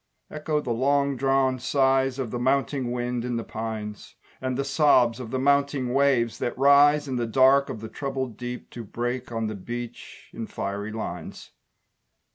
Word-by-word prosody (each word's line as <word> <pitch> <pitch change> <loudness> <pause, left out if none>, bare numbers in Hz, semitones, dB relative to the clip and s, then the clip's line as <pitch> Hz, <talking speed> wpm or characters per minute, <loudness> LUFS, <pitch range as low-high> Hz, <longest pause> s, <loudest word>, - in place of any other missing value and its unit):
Echo 150 0 -1
the 125 - -4
long 140 +3 +1
drawn 135 0 +1
sighs 135 0 +2
Of 130 -5 -3
the 120 - -3
mounting 135 0 0
wind 120 -1 -2
in 125 -1 -2
the 115 - -2
pines; 110 -2 -6 0.3
And 130 -1 -2
the 140 - 0
sobs 135 -4 +3
of 125 -3 -6
the 130 - -2
mounting 140 -1 +1
waves 135 -4 +2
that 120 - -3
rise 145 +2 +5
In 130 -2 -2
the 120 -1 -1
dark 135 +4 +4
of 110 - -6
the 110 - -6
troubled 130 -1 -4
deep 125 +2 -7
To 120 - -7
break 120 +4 -4
on 115 -1 -2
the 110 - -3
beach 120 +4 -8
in 115 - -5
fiery 100 +2 -4
lines. 90 -6 -7
125 Hz, 175 wpm, -25 LUFS, 115-135 Hz, 0.3 s, rise